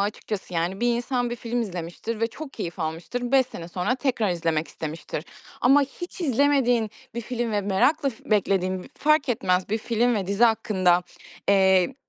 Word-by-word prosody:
açıkçası, 205 -2 -3
yani? 175 +4 -1
Bir 240 0 +2
insan 245 0 -1
bir 240 - -3
film 240 +1 -2
izlemiştir 190 +2 -4
ve 230 - +3
çok 275 +5 -9
keyif 180 -4 -5
almıştır. 175 +11 -3
5 265 -2 +5
sene 170 -8 -8
sonra 180 +7 0
tekrar 255 -6 0
izlemek 165 -2 -1
istemiştir 155 0 -6 0.4
ama 275 +3 +6
hiç 350 +7 -7
izlemediğin 260 - +2 0.2
bir 235 - -2
film 235 0 -3
ve 205 - +1
merakla 265 +10 +2
f 225 - -15
beklediğin, 190 -3 +1
fark 305 -2 +3
etmez, 185 -5 +1
bir 220 +2 0
film 235 +2 +1
ve 200 -4 -1
dizi 200 +4 +3
hakkında, 190 -6 +3 0.5
eee, 190 +3 +4
220 Hz, 170 wpm, -25 LUFS, 185-245 Hz, 0.5 s, ama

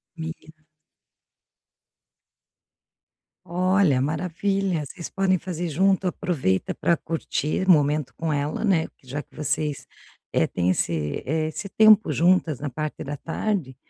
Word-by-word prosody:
Menina 160 -1 -9 2.8
Olha, 180 -5 +2
maravilha. 175 +3 -1
Vocês 170 +4 -8
podem 190 -1 +1
fazer 175 -1 -4
junto, 190 +4 +2
aproveita 150 - -1
pra 170 - +2
curtir 165 +2 -2
o 185 - +8
momento 150 -2 +2
com 165 -1 -2
ela, 145 +6 -2
né, 180 -6 +2
porque 130 - -27
já 145 +3 -3
que - - -33
vocês, 150 -1 -2 0.5
eh, - - +3
têm 90 0 -1
esse, 80 -5 -1
eh, 155 +3 0 0.3
tempo 215 -1 +7
juntas 170 -4 +2
na 145 - -3
parte 150 +4 -4
da 145 - -4
tarde, 165 -4 -2
160 Hz, 125 wpm, -24 LUFS, 145-185 Hz, 2.8 s, o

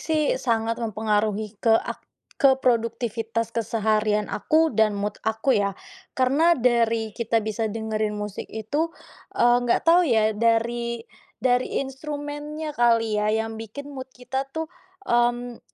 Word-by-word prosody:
sih 310 -2 +1
sangat 230 -1 0
mempengaruhi 215 -1 -1
ke 225 -1 +4
ak - - -4 0.4
ke 275 -1 +5
produktivitas 230 -2 0
keseharian 215 -2 0
aku 320 +8 +2
dan 220 -1 +3
mood 205 +1 -3
aku 220 +4 +1
ya. 200 -1 +1 0.4
Karena 280 +7 +3
dari 230 -5 +1
kita 230 -1 +1
bisa 215 +1 -2
dengerin 215 0 -2
musik 210 -1 -5
itu, 290 +10 -2 0.4
eee 240 0 +5
nggak 240 - +2
tahu 340 +2 +6
ya, 220 -2 +3
dari 235 +1 0 0.3
dari 250 0 +1
instrumennya 295 +2 -6
kali 230 -2 +3
ya, 210 - +1
yang 220 +1 -1
bikin 285 +7 -8
mood 260 -1 -7
kita 265 +2 -4
tuh, 320 0 -3 0.4
mmm, 240 -1 0
230 Hz, 135 wpm, -24 LUFS, 220-260 Hz, 0.4 s, tahu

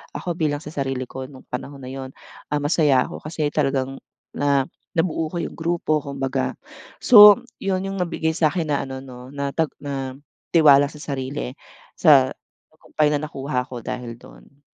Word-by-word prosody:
ako 175 -2 -3
bilang 150 -3 0
sa 150 - -8
sarili 135 -2 -2
ko 130 +1 -7
nung 130 -1 -14
panahon 140 +2 -6
na 125 - -7
yun, 135 -1 -7 0.4
ah, 150 - +1
masaya 145 -3 +3
ako - - -9
kasi 155 -1 -2
talagang 135 -1 0 0.4
na 140 -2 +2 0.3
nabuo 165 -1 0
ko 175 - -3
yung - - -5
grupo 165 -2 0
kumbaga. 135 -1 -2 0.5
So, 210 0 +9 0.2
yun 190 -1 0
yung 195 - -4
nabigay 165 -2 -1
sa 160 - +3
akin 165 0 -2
na 145 - +2
ano 130 0 -6
no, 125 -1 -11
na 140 -1 -3
tag 160 -2 +1
na 135 -2 -4 0.4
tiwala 145 -4 +7
sa 150 0 -12
sarili 135 -2 -4 0.5
sa 140 -6 +6 0.4
tagumpay 155 -1 -1
na 150 - +1
nakuha 135 -3 -3
ko 125 -2 -8
dahil 120 0 -5
dun. - - -17
145 Hz, 170 wpm, -22 LUFS, 135-160 Hz, 0.5 s, So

